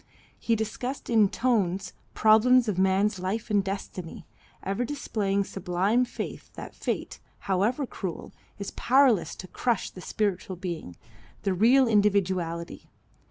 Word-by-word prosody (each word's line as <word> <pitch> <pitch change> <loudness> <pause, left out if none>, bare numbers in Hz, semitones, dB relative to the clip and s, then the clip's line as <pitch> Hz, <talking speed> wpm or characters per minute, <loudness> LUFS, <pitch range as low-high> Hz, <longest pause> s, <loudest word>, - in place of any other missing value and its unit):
He 230 - +1
discussed 225 +5 -4
in 215 -4 +5
tones 200 -6 0 0.2
problems 235 +3 +5
of 195 -4 -1
man's 190 +1 +2
life 215 +5 -3
and 205 -2 +3
destiny, 190 -3 -6 0.4
ever 195 +5 -1
displaying 215 -7 -1
sublime 195 +7 0
faith - - -7
that - - -9
Fate, - - -4 0.3
however 210 +9 +1
cruel, 190 -8 -6 0.3
is 200 -1 -5
powerless 250 - +3
to 185 - -9
crush 235 +3 -1
the 180 - -11
spiritual 195 -2 -2
being, 170 - -6 0.5
the 195 -2 +1
real 245 +7 +5
individuality. 190 -6 0
205 Hz, 125 wpm, -27 LUFS, 185-230 Hz, 0.5 s, in